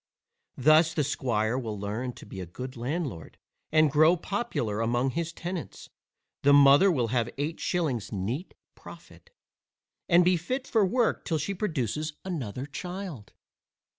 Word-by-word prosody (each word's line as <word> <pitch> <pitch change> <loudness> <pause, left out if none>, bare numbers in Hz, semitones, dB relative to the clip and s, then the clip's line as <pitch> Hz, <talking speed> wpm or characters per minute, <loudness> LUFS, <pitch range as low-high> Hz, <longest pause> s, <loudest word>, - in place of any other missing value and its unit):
Thus 155 +4 +5
the 150 - +2
squire 120 -4 0
will 110 -5 -5
learn 110 +5 -3
to - - -13
be 95 - -9
a 90 - -6
good 125 +9 -7
landlord, 125 - -4 0.3
and 155 -2 +4
grow 155 +5 +5
popular 160 - -2
among 120 +3 +1
his 170 +3 -3
tenants, 175 0 -7 0.5
the 145 - +5
mother 140 +6 +7
will 125 -8 0
have 120 -1 0
eight 150 +4 -3
shillings 145 - -1
neat 110 - -4 0.2
profit, 485 - -14 0.8
and 175 0 +6
be 180 0 +4
fit 255 +11 -3
for 220 -3 +3
work 230 +4 +1
till 165 - -1
she 155 +7 -2
produces 155 - -2
another 135 - -4
child. 175 - -7
145 Hz, 145 wpm, -28 LUFS, 120-175 Hz, 0.8 s, mother